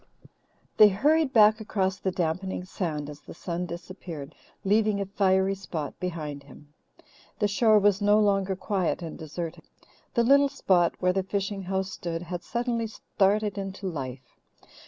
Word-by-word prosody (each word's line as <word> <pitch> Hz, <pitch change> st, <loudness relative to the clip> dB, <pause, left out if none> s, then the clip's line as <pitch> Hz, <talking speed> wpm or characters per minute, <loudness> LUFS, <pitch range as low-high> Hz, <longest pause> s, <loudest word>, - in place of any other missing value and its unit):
They 210 Hz, -1 st, +9 dB
hurried 295 Hz, +8 st, +2 dB
back 215 Hz, -1 st, +6 dB
across 195 Hz, -3 st, -1 dB
the 190 Hz, -, -1 dB
dampening 180 Hz, +1 st, -2 dB
sand 160 Hz, -6 st, -3 dB
as 150 Hz, 0 st, -9 dB
the -, -, -12 dB
sun 175 Hz, +1 st, -4 dB
disappeared, 170 Hz, -4 st, -8 dB, 0.3 s
leaving 210 Hz, +1 st, +3 dB
a 200 Hz, -, -1 dB
fiery 190 Hz, -1 st, +2 dB
spot 170 Hz, -6 st, -6 dB
behind 155 Hz, -5 st, -4 dB
him. 145 Hz, +2 st, -16 dB, 0.6 s
The 210 Hz, -, +2 dB
shore 215 Hz, +1 st, +4 dB
was 205 Hz, -1 st, +3 dB
no 205 Hz, +1 st, +5 dB
longer 195 Hz, -2 st, +2 dB
quiet 185 Hz, -2 st, -1 dB
and 165 Hz, -, -6 dB
deserted. 160 Hz, +1 st, -6 dB, 0.5 s
The 235 Hz, -, +4 dB
little 280 Hz, +3 st, +5 dB
spot 175 Hz, -8 st, +2 dB
where 180 Hz, 0 st, +3 dB
the 190 Hz, -, +1 dB
fishing 195 Hz, +1 st, -3 dB
house 190 Hz, +1 st, -2 dB
stood 170 Hz, -2 st, -4 dB
had 175 Hz, 0 st, -5 dB
suddenly 235 Hz, +3 st, -2 dB
started 205 Hz, -1 st, 0 dB
into 195 Hz, 0 st, -6 dB
life. 130 Hz, -6 st, -6 dB
190 Hz, 155 wpm, -27 LUFS, 170-205 Hz, 0.6 s, They